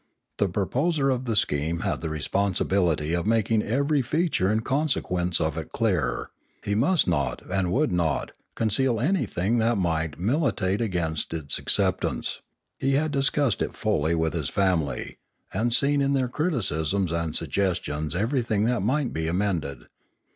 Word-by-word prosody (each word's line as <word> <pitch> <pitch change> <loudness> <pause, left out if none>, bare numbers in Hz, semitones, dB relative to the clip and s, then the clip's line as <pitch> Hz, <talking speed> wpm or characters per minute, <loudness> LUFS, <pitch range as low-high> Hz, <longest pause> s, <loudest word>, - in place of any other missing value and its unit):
The 100 - +1
proposer 135 - +1
of 130 0 -2
the 115 -3 -1
scheme 80 -2 0
had - - -1
the 80 - -3
responsibility 85 -1 0
of 85 +3 -1
making 110 -1 +2
every 140 +6 +1
feature 145 - +1
and 110 +1 0
consequence 90 - 0
of 80 0 -1
it 80 - -8
clear; 85 - 0 0.3
he 100 - 0
must 145 - +3
not, 70 -8 0
and 95 -2 0
would 150 +8 +2
not, 85 -4 0 0.2
conceal 115 +2 +1
anything 120 - +1
that 115 0 +2
might 80 -4 -1
militate 105 - 0
against 85 -7 -1
its 75 -4 -2
acceptance; - - 0 0.4
he 135 +1 +1
had 150 +2 +1
discussed 140 -3 +1
it - - -3
fully 80 +3 +1
with 80 -1 0
his 80 -5 -2
family, 85 - -1 0.3
and 110 +5 0
seen 140 +4 +3
in 140 0 +2
their 130 -2 +1
criticisms 100 - 0
and 85 -2 -2
suggestions 80 -5 -1
everything 110 0 0
that 120 +2 +1
might 130 +6 0
be 80 0 -2
amended. 85 -8 -1
100 Hz, 150 wpm, -25 LUFS, 85-130 Hz, 0.4 s, must